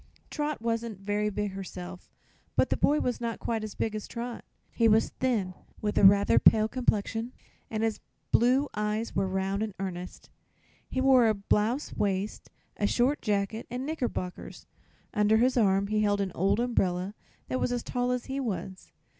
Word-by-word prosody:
Trot 295 Hz, -5 st, -2 dB
wasn't 230 Hz, -2 st, -2 dB
very 205 Hz, +1 st, 0 dB
big 210 Hz, 0 st, -2 dB
herself, 185 Hz, -1 st, -8 dB, 0.5 s
but -, -, +2 dB
the -, -, +3 dB
boy 295 Hz, +1 st, +3 dB
was 245 Hz, -1 st, -1 dB
not 230 Hz, -1 st, -2 dB
quite 225 Hz, -2 st, -2 dB
as 215 Hz, -, -6 dB
big 220 Hz, -, -1 dB
as 215 Hz, -1 st, -5 dB
Trot. 235 Hz, 0 st, -6 dB, 0.3 s
He 230 Hz, -, +3 dB
was 220 Hz, 0 st, +4 dB
thin, 220 Hz, -8 st, -1 dB, 0.3 s
with 210 Hz, -1 st, -2 dB
a -, -, +3 dB
rather 200 Hz, +1 st, +6 dB
pale 215 Hz, -1 st, +5 dB
complexion 225 Hz, 0 st, -1 dB, 0.4 s
and 220 Hz, 0 st, -2 dB
his 225 Hz, -1 st, 0 dB, 0.3 s
blue 255 Hz, +5 st, +4 dB
eyes 210 Hz, +2 st, -2 dB
were 195 Hz, -, +1 dB
round 190 Hz, +1 st, -1 dB
and 215 Hz, -3 st, -3 dB
earnest. 180 Hz, -2 st, -6 dB, 0.6 s
He 260 Hz, -, -2 dB
wore 260 Hz, -3 st, +5 dB
a 215 Hz, -, +3 dB
blouse 210 Hz, +7 st, 0 dB
waist, 200 Hz, 0 st, -2 dB, 0.3 s
a 205 Hz, -, +1 dB
short 255 Hz, +7 st, +1 dB
jacket 210 Hz, +1 st, -1 dB
and 250 Hz, +2 st, -4 dB
knickerbockers. 250 Hz, -, -4 dB, 0.5 s
Under 210 Hz, 0 st, +4 dB
his 250 Hz, +3 st, +3 dB
arm 200 Hz, -4 st, +3 dB
he 215 Hz, +1 st, 0 dB
held 205 Hz, -1 st, +2 dB
an 195 Hz, -2 st, -1 dB
old 195 Hz, +4 st, +1 dB
umbrella 195 Hz, -6 st, 0 dB, 0.3 s
that 255 Hz, -, -1 dB
was -, -, 0 dB
as 245 Hz, -1 st, -1 dB
tall 245 Hz, -1 st, -1 dB
as 250 Hz, -1 st, -1 dB
he 270 Hz, 0 st, -3 dB
was. 190 Hz, -6 st, -5 dB
215 Hz, 175 wpm, -28 LUFS, 200-245 Hz, 0.6 s, rather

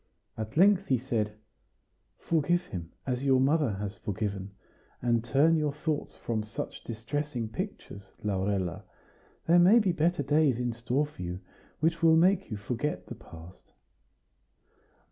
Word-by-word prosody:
At 110 Hz, +4 st, -6 dB
length 195 Hz, +2 st, +5 dB
he 130 Hz, -, +3 dB
said: 110 Hz, -4 st, -2 dB, 0.8 s
"Forgive 170 Hz, +2 st, +1 dB
him, 85 Hz, -, -7 dB
as 125 Hz, 0 st, -2 dB
your 135 Hz, -2 st, +4 dB
mother 140 Hz, -3 st, +2 dB
has 100 Hz, 0 st, -4 dB
forgiven! 100 Hz, -1 st, -3 dB, 0.5 s
And 120 Hz, -2 st, +1 dB
turn 140 Hz, +7 st, +4 dB
your 150 Hz, -2 st, +1 dB
thoughts 150 Hz, +1 st, -3 dB
from 115 Hz, -2 st, -2 dB
such 110 Hz, +2 st, -6 dB
distressing 120 Hz, +2 st, -3 dB
pictures, 110 Hz, -, -7 dB
Laurella; 95 Hz, -2 st, -1 dB, 0.6 s
there 170 Hz, +2 st, +5 dB
may 185 Hz, +7 st, +7 dB
be 205 Hz, -6 st, +3 dB
better 170 Hz, -1 st, +1 dB
days 145 Hz, -2 st, +3 dB
in 120 Hz, -1 st, -1 dB
store 120 Hz, +5 st, 0 dB
for 145 Hz, -10 st, -12 dB
you, 90 Hz, +1 st, -5 dB, 0.4 s
which 165 Hz, +1 st, +1 dB
will 165 Hz, -1 st, +6 dB
make 185 Hz, +3 st, +3 dB
you 105 Hz, -, -4 dB
forget 120 Hz, +8 st, -3 dB
the -, -, -7 dB
past." 85 Hz, +3 st, -14 dB
130 Hz, 145 wpm, -29 LUFS, 105-160 Hz, 0.8 s, may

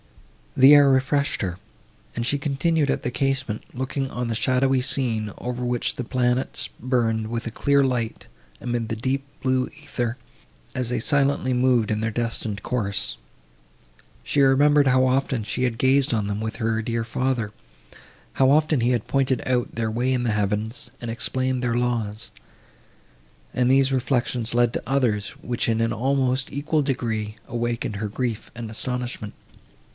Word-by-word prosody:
The 135 Hz, +3 st, +9 dB
air 145 Hz, -1 st, +7 dB
refreshed 135 Hz, 0 st, +1 dB
her, 90 Hz, -1 st, -3 dB, 0.6 s
and 115 Hz, -, -2 dB
she 145 Hz, -, +1 dB
continued 145 Hz, +1 st, +1 dB
at -, -, 0 dB
the 125 Hz, -, -2 dB
casement, 135 Hz, -5 st, -1 dB
looking 130 Hz, +1 st, -3 dB
on 125 Hz, -2 st, -3 dB
the 115 Hz, -, -2 dB
shadowy 130 Hz, +2 st, +2 dB
scene, 115 Hz, -5 st, +1 dB
over 125 Hz, 0 st, -4 dB
which 120 Hz, -1 st, -1 dB
the 125 Hz, -, -3 dB
planets 125 Hz, +1 st, 0 dB
burned 115 Hz, -3 st, 0 dB
with 115 Hz, +1 st, -3 dB
a -, -, -3 dB
clear 140 Hz, +4 st, +2 dB
light, 125 Hz, -4 st, -2 dB, 0.3 s
amid 120 Hz, -2 st, -2 dB
the 115 Hz, -, -1 dB
deep 130 Hz, +4 st, -1 dB, 0.2 s
blue 130 Hz, -1 st, +1 dB
æther, 125 Hz, -6 st, -4 dB, 0.6 s
as 125 Hz, -2 st, -1 dB
they 125 Hz, -1 st, 0 dB
silently 140 Hz, +1 st, +2 dB
moved 125 Hz, -3 st, +2 dB
in 110 Hz, -1 st, 0 dB
their 110 Hz, 0 st, -1 dB
destined 110 Hz, -3 st, -3 dB
course. 100 Hz, -6 st, -1 dB, 1.1 s
She 145 Hz, -, +2 dB
remembered 140 Hz, +1 st, +5 dB
how 130 Hz, 0 st, +4 dB
often 130 Hz, -2 st, +1 dB
she 125 Hz, +4 st, -2 dB
had 120 Hz, -3 st, 0 dB
gazed 130 Hz, +1 st, +3 dB
on 105 Hz, -3 st, 0 dB
them 105 Hz, +1 st, -3 dB
with 110 Hz, +1 st, -4 dB
her 115 Hz, -1 st, 0 dB
dear 115 Hz, 0 st, -2 dB
father, 120 Hz, -2 st, -1 dB, 0.8 s
how 130 Hz, -1 st, +4 dB
often 150 Hz, -1 st, +3 dB
he 120 Hz, -, +2 dB
had 120 Hz, -2 st, 0 dB
pointed 130 Hz, 0 st, 0 dB
out 125 Hz, -1 st, 0 dB
their 110 Hz, -1 st, -1 dB
way 120 Hz, +3 st, 0 dB
in 125 Hz, -2 st, +1 dB
the 120 Hz, -, +1 dB
heavens, 105 Hz, +3 st, -2 dB
and 120 Hz, -, -6 dB
explained 130 Hz, +2 st, -1 dB
their 120 Hz, -1 st, 0 dB
laws; 115 Hz, -4 st, -2 dB, 1.2 s
and 125 Hz, 0 st, +2 dB
these 135 Hz, 0 st, +4 dB
reflections 125 Hz, -3 st, 0 dB
led 120 Hz, -1 st, +3 dB
to -, -, -3 dB
others, 120 Hz, -7 st, +1 dB
which, 120 Hz, -1 st, -2 dB
in 115 Hz, 0 st, +1 dB
an 115 Hz, 0 st, +1 dB
almost 130 Hz, +1 st, 0 dB
equal 150 Hz, +2 st, 0 dB
degree, 115 Hz, -6 st, -2 dB
awakened 120 Hz, -3 st, -2 dB
her 105 Hz, 0 st, -3 dB
grief 115 Hz, 0 st, -3 dB
and 115 Hz, -2 st, -6 dB
astonishment. 125 Hz, -2 st, -4 dB
125 Hz, 165 wpm, -24 LUFS, 115-130 Hz, 1.2 s, The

